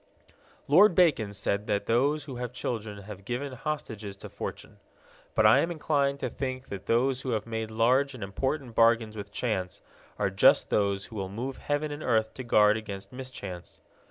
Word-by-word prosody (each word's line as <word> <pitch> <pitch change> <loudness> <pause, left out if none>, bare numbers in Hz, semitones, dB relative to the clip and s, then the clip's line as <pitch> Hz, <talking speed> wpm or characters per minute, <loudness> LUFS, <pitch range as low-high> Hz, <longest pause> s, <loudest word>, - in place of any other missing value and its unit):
Lord 180 +6 +6
Bacon 145 - +3
said 100 +1 -2
that 100 - 0
those 140 +6 +2
who 135 -4 -7
have 125 -1 -4
children 110 -5 -4
have 100 -1 -9
given 125 +5 -4
hostages 115 -7 -5
to 100 - -10
fortune. - - -7 0.6
But 110 - +4
I 110 +5 +7
am 165 - +1
inclined 145 -4 0
to - - -1
think 130 -1 -4
that 100 0 -7
those 130 +3 +2
who 130 - -4
have 110 -1 -1
made 110 -1 -3
large 130 +5 +2
and 115 - -7
important 130 +6 -2
bargains 115 -1 +3
with 100 -1 -7
chance 100 -6 -2 0.4
are 100 -2 0
just 95 - +4
those 100 -1 +1
who 110 - -10
will 95 -1 -3
move 125 +7 -5
heaven 145 +1 -2
and 145 +1 -6
earth 110 -4 +1
to 130 - -7
guard 105 -2 +4
against 100 -2 -7
mischance. 100 -9 -8
115 Hz, 185 wpm, -28 LUFS, 105-135 Hz, 0.6 s, I